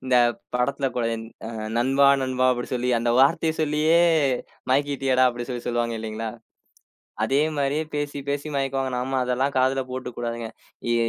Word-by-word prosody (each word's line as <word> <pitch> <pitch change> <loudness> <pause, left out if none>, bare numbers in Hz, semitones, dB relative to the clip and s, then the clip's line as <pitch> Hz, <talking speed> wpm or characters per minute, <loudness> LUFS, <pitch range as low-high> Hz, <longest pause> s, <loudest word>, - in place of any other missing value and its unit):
இந்தப் 120 -2 +3 0.2
படத்துல 135 +3 0
கூட, 120 - 0 0.7
"நண்பா, 135 +3 +4
நண்பா" 130 0 +1
அப்டி 120 0 -4
சொல்லி 125 0 0
அந்த 120 0 0
வார்த்தையச் 160 +3 +3
சொல்லியே 155 +2 +2 0.7
மயக்கிட்டியேடா 135 -2 +2
அப்டி 120 0 -5
சொல்லி 120 -1 -4
சொல்லுவாங்க 120 -1 0
இல்லைங்களா? 110 0 -4 0.9
அதே 135 +6 +2 0.2
மாரியே 145 +2 0
பேசிப் 145 -1 -3
பேசி 145 +1 -2
மயக்குவாங்க. 135 -1 -1
நாம 130 +2 -2
அதெல்லாம் 130 +3 0
காதுல 130 +1 +3
போட்டுக்குடாதுங்க. 120 -2 -4 0.4
ஏ 120 - +3
130 Hz, 135 wpm, -24 LUFS, 120-140 Hz, 0.9 s, நண்பா